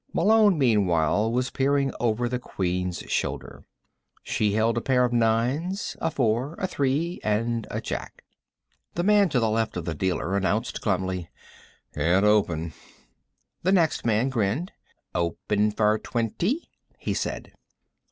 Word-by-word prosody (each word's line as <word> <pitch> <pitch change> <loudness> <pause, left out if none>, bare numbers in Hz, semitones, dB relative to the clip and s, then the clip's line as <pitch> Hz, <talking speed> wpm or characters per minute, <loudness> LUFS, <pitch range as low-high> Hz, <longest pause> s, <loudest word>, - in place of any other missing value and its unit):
Malone, 215 -4 +4
meanwhile, 105 - +2
was 125 +2 0
peering 140 0 +1
over 120 0 +1
the 125 0 -2
Queen's 90 -5 -2
shoulder. - - -3 0.6
She 105 -2 0
held 110 +1 +2
a 115 - 0
pair 125 0 +3
of 120 - -2
nines, 120 - 0
a - - +1
four, 130 +2 0
a - - -2
three 155 +1 -1
and 115 +2 0
a - - -3
Jack. - - -6 0.7
The 175 - 0
man 205 -1 +4
to 135 - +1
the 115 - +2
left 110 -3 -1
of 85 - -4
the 85 - -2
dealer 90 +3 -1
announced 100 +4 -1
glumly: 95 -3 -1 0.6
"Can't 85 +7 +2
open." 85 -7 +2 0.9
The 185 +3 +2
next 170 -5 +2
man 115 +3 +2
grinned. 125 - -1 0.4
"Open 100 +5 0
for 105 0 +2
twenty," 170 - -2 0.3
he - - -2
said. - - -4
115 Hz, 140 wpm, -25 LUFS, 100-135 Hz, 0.9 s, Malone